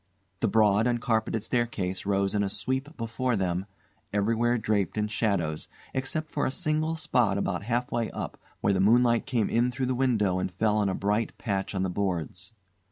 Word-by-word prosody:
The - - +2
broad 110 0 +4
uncarpeted 115 -2 0
staircase 105 -6 -1
rose 100 0 +1
in 105 - +1
a 100 - 0
sweep 130 +8 -3
before 115 +2 -1
them, 95 -1 -1 0.4
everywhere 115 +4 +2
draped 105 -3 0
in 105 0 +1
shadows, 100 -8 -1 0.3
except 155 +4 -2
for 145 - 0
a - - +1
single 155 +1 0
spot 120 -10 +1
about 100 -3 -1
half 120 +4 -1
way 120 -2 0
up - - -6 0.2
where 100 - +3
the 95 - +1
moonlight 120 +4 +4
came 120 -6 +1
in 120 +2 +2
through 130 +1 -2
the 130 - 0
window 110 -8 +2
and 90 - -2
fell 105 +3 +2
on 100 -2 +2
a 95 - -1
bright 105 +3 0
patch 100 -3 -2
on 95 - 0
the 95 - 0
boards. 90 +1 -2
110 Hz, 185 wpm, -28 LUFS, 100-120 Hz, 0.4 s, broad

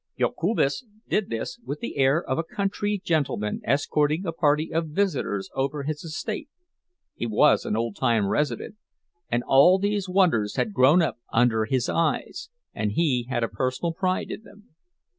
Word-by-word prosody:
Jokubas 165 - 0 0.2
did 210 - 0
this 115 - -4
with 145 -5 -5
the - - -5
air 135 +5 +3
of 130 - -2
a - - 0
country 200 +3 -2
gentleman 140 -10 -1
escorting 145 +5 +1
a 165 - -1
party 155 -1 +1
of 165 0 0
visitors 150 - -1
over 140 +2 -2
his 150 +1 -4
estate; 170 - -5 0.6
he 120 - -4
was 110 - +3
an - - -1
old 115 -2 -2
time 115 -5 +2
resident, 145 - -2 0.5
and 120 +1 0
all 160 +8 +6
these 200 -1 -1
wonders 170 - +2
had 215 - -1
grown 150 +4 +5
up 160 - -2
under 115 -2 +3
his 125 +2 0
eyes, 165 - -1 0.2
and 105 -1 -2
he 125 -5 +1
had 120 -3 -1
a - - +1
personal 130 +8 -2
pride 185 +1 -1
in - - -6
them. 210 0 -18
150 Hz, 165 wpm, -25 LUFS, 120-180 Hz, 0.6 s, all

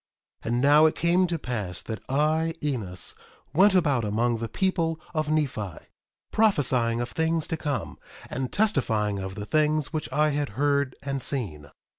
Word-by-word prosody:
1:19 - - -4
And 120 +1 +1
now 150 +2 +7
it 155 - -1
came 175 +2 +3
to 170 -1 -1
pass 105 - -4
that 110 -3 -6
I, 155 +4 +1
Enos, 110 -11 -2 0.4
went 190 +4 +5
about 145 -9 +3
among 115 +3 +1
the 115 0 -4
people 165 -4 0
of 155 -2 -1
Nephi, 130 - -1 0.5
prophesying 130 - +2
of 120 0 -2
things 160 -1 0
to 165 - 0
come, 145 -3 -4 0.3
and 130 0 -4
testifying 110 - +1
of 95 0 -5
the 105 - -5
things 155 +3 +1
which 155 - -3
I 150 0 +3
had 145 -1 -1
heard 140 -1 +1
and 140 -1 -2
seen. 85 - -2
140 Hz, 165 wpm, -26 LUFS, 115-160 Hz, 0.5 s, now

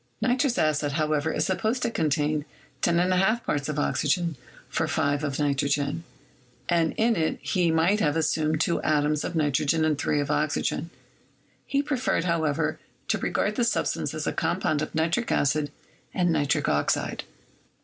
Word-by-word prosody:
Nitrous 250 +2 +1
acid, 150 -2 +1
however, 155 0 0
is - - 0
supposed 220 +6 -1
to 235 - 0
contain 150 -3 0 0.4
loyi 185 +6 +2
parts 145 0 -2
of 150 - -3
oxygen 160 +3 0 0.3
for 160 - -1
5 145 -2 0
of 140 -2 -2
nitrogen, 145 +2 0 0.6
and 165 -2 +1
in 230 +1 +3
it 160 -2 0
he 180 -4 +1
might 165 +6 +3
have 150 -6 +1
assumed 155 -1 +1
two 170 +1 +1
atoms 150 0 +1
of - - -4
nitrogen 150 +1 +2
and 155 -2 +1
three 150 - +1
of 145 0 -1
oxygen. 150 +2 -1 0.8
He 280 0 +1
preferred, 265 - 0
however, 160 -2 0 0.3
to - - +1
regard 210 - -1
this 235 -1 +2
substance - - -1
as - - -3
a - - -1
compound 150 -2 0
of 155 - -4
nitric 170 +9 0
acid 145 +1 +1 0.5
and 175 -2 +2
nitric 145 -3 +1
oxide. - - 0
155 Hz, 155 wpm, -26 LUFS, 150-180 Hz, 0.8 s, in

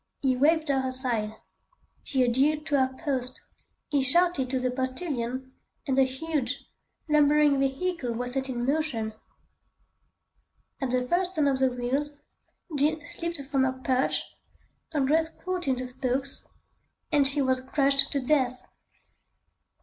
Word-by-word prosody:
He 260 -2 +3
waved 310 +3 +3
her 270 -1 +2
aside. 240 -5 -1 0.7
She 265 -2 +1
adhered 280 +5 +2
to 285 -3 +2
her 260 0 +2
post. 255 -3 -1 0.5
He 285 -2 +2
shouted 280 0 +3
to 260 0 0
the 255 0 0
postilion, 260 -1 -3 0.3
and 270 -4 0
the 270 0 +5
huge, 270 -1 -3 0.4
lumbering 295 -1 +4
vehicle 275 0 -1
was 245 +2 -3
set 265 0 -1
in 240 -1 -2
motion. 270 -7 -1 1.7
At 265 - -1
the 250 0 0
first 360 +4 +1
turn 300 -2 +3
of 270 -1 +1
the 265 -1 +4
wheels, 265 +4 -2 0.6
Jean 300 +1 +1
slipped 335 -2 -4
from 270 -2 +3
her 260 0 +1
perch, 260 0 0 0.7
her 300 -3 0
dress 320 +4 +2
caught 365 -1 -4
in 265 - +3
the 255 0 -4
spokes, 260 +2 -2 0.6
and 290 -3 +4
she 275 +2 +2
was 260 -1 +1
crushed 275 +1 +2
to 280 - +1
death. 255 -2 +1
270 Hz, 140 wpm, -27 LUFS, 255-300 Hz, 1.7 s, the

